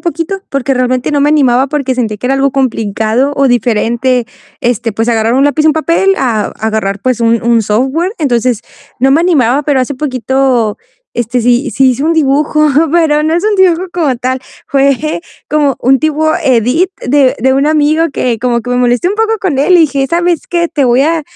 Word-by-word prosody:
poquito, 340 +3 -3
porque 275 0 -1
realmente 255 0 -1
no 290 - +1
me 290 - +2
animaba, 270 -4 +2
porque 275 -3 -2
sentí 220 -4 -2
que 250 - -4
era 270 - +1
algo 275 0 +1
complicado 235 0 -1
o 275 - +2
diferente, 240 +1 0 0.3
este, 240 -1 -1
pues, 225 +3 -2
agarrar 225 0 +1
un 270 +2 +3
lápiz, 290 +1 +1
y - - +4
un - - +4
papel, 335 +5 +1
a 230 - -1
agarrar, 215 -3 -2
pues, 255 0 -1
un 230 0 +1
un 235 -1 +2
software. 265 - -1
Entonces, 245 -6 0 0.4
no 265 +2 +2
me 305 - +3
animaba, 290 -6 +2
pero 285 -2 +1
hace 255 +3 -2
poquito, 255 -4 -1 0.4
este, 240 +1 -1
sí 245 +4 +1
sí 265 -1 +3
hice 255 +2 -3
un 325 - +2
dibujo, 305 0 +1 0.2
pero 315 -3 +2
no 315 +1 0
es 345 - -1
un 430 0 +1
dibujo, 365 -2 +2
como 305 -7 0
tal. 255 +2 -3 0.3
Fue 280 +3 0 0.3
como 290 -3 +1
un 265 +2 +3
tipo 310 +1 0
edit, 260 - +1 0.2
de 270 0 +2
de 265 +3 +1
un 275 +2 +1
amigo, 310 +1 +2
que 240 -4 -1
como 240 0 0
que 245 - -6
me 245 - 0
molesté 245 +6 +1
un 395 - -2
poco 445 +1 0
con 335 -9 -1
él, 360 +6 +4
y - - +4
dije: 280 -4 +1
"¿Sabes 345 0 0
qué? 340 -1 0
Te 295 -4 -1
voy 245 +1 +3
a 320 +2 0
270 Hz, 205 wpm, -11 LUFS, 245-310 Hz, 0.4 s, y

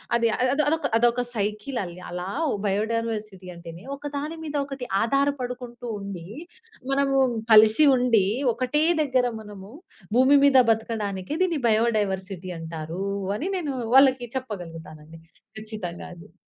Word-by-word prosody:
అది 230 -1 +3 0.3
అదొదొక 300 -1 0
అదొక 240 +1 +2
సైకిలల్లి 210 -3 -3
అలా 180 +1 -5 0.2
వ్ - - 0
బయోడైవర్సిటీ 215 -2 -2
అంటేనే 170 +1 -10
ఒకదాని 290 +3 -5
మీద 300 -1 -5
ఒకటి 270 -3 -7
ఆధారపడుకుంటూ 250 -2 -2
ఉండి, 190 -4 -7 0.6
మనము 275 0 +2 0.4
కలిసి 220 +7 +7
ఉండి, 235 -6 +3 0.3
ఒకటే 255 +5 0 0.2
దగ్గర 260 -3 +2 0.2
మనము 205 -1 -11 0.4
భూమి 265 +3 +6
మీద 270 -2 +5
బతకడానికి 215 -2 -3
దీన్ని 335 -6 -1
బయోడైవర్సిటీ 195 -5 0
అంటారూ, 165 +3 -5 0.3
అని 360 - -3
నేను 295 -6 -3 0.2
వాళ్ళకి 265 -2 +5
చెప్పగలుగుతానండి. 165 -8 -8 0.4
ఖచ్చితంగా 215 -6 -7
అది. 175 +4 -16
225 Hz, 115 wpm, -25 LUFS, 190-265 Hz, 0.6 s, కలిసి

